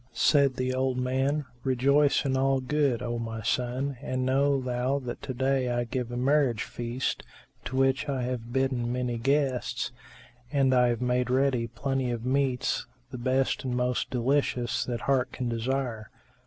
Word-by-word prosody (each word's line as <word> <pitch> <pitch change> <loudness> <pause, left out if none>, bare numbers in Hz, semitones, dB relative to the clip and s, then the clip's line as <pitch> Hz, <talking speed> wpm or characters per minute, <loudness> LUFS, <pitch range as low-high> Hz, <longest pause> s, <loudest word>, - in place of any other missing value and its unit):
Said 140 +1 +4
the 130 0 -1
old 130 0 0
man, 135 +3 0 0.2
"Rejoice 140 +3 +3
in 135 -1 +1
all 135 0 +2
good, 130 -2 0
O 120 -1 -2
my 115 -1 -5
son, 125 +4 -1
and 130 -2 -2
know 140 +1 +2
thou 125 +1 0
that 125 -3 -6
to - - -5
day 130 0 +1
I 120 0 0
give 120 0 -3
a 120 - -3
marriage 130 -3 +2
feast, 120 +2 -3 0.4
to 130 - -4
which 135 +2 +2
I 135 -2 -1
have 120 -2 -4
bidden 130 -2 0
many 125 -1 -2
guests, 135 0 0 0.6
and 135 -3 +3
I 125 -1 +5
have 120 0 0
made 125 0 +1
ready 130 -2 +2
plenty 130 +2 -2
of 120 -1 -3
meats, 130 -1 0 0.2
the 125 - -6
best 130 +2 +1
and 125 -2 -2
most 125 0 0
delicious 125 -1 0
that 120 -2 -3
heart 130 -2 +1
can 125 -2 -2
desire. 120 -1 -2
130 Hz, 170 wpm, -28 LUFS, 120-135 Hz, 0.6 s, I